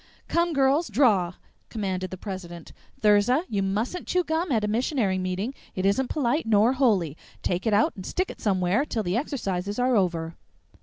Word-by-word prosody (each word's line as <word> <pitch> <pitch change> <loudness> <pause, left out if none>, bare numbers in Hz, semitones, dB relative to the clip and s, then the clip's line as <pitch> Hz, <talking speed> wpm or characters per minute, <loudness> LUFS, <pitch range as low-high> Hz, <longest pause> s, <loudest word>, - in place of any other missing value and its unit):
"Come, 340 0 +1
girls, 275 +4 +3
draw!" 200 -7 +3 0.3
commanded 190 -4 -3
the 185 - -7
president. 180 -4 -8 0.3
"Thirza, 215 +8 +4
you 200 -2 -1
mustn't 215 - -2
chew 360 0 +1
gum 320 +1 -1
at 220 -4 +2
a - - +1
missionary 220 -3 0
meeting, 185 +7 -2 0.2
it 185 - -1
isn't 245 +6 +2
polite 285 -1 0
nor 220 +3 +4
holy. 205 - +2 0.3
Take 180 +5 -1
it 220 - +2
out 210 - +2
and 190 - -8
stick 370 - -2
it - - -13
somewhere 190 +3 +1
till 230 -7 -2
the 180 0 -1
exercises 205 -7 -2
are 250 0 +2
over." 170 -5 0
210 Hz, 175 wpm, -26 LUFS, 185-265 Hz, 0.3 s, Thirza